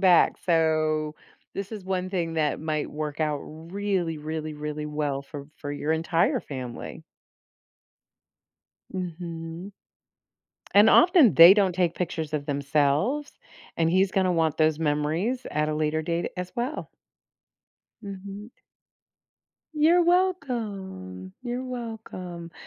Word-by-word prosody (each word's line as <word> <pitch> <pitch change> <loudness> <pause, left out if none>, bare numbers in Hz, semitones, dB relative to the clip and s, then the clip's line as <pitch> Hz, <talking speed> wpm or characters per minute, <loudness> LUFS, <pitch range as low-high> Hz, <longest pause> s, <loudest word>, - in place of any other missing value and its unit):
back, 180 -3 +5
so 155 -2 +1 0.4
this 195 +2 -5
is 205 -4 -7
one 185 -1 -2
thing 170 -4 -2
that 150 -2 +1
might 155 -1 -2
work 150 0 -4
out 150 -2 +1
really 170 +1 -3
really 155 0 -4
really 150 0 -4
well 150 -2 -2
for 140 0 -9
for 145 - -6
your 150 +2 -1
entire 165 +1 +1
family. 125 -4 -7 1.9
Mhm. 170 0 -6 1.0
And 210 +2 +8
often 340 - +6
they 170 +4 +10
don't 195 -3 +3
take 175 -2 +1
pictures 160 -3 -3
of 145 0 -2
themselves, 145 - +1 0.5
and 165 -1 +2
he's 190 +2 +3
gonna 185 -2 +2
want 160 -2 +1
those 155 -1 +3
memories 160 - 0
at 150 0 0
a 155 - -1
later 155 +1 0
date 170 +1 -2
as 180 0 -4
well. 250 +6 -3 1.1
Mhm. 200 +2 -8 1.3
You're 335 +4 +5
welcome. 210 - -1
You're 245 +1 -3
welcome. 220 -9 -7
165 Hz, 120 wpm, -26 LUFS, 155-200 Hz, 1.9 s, they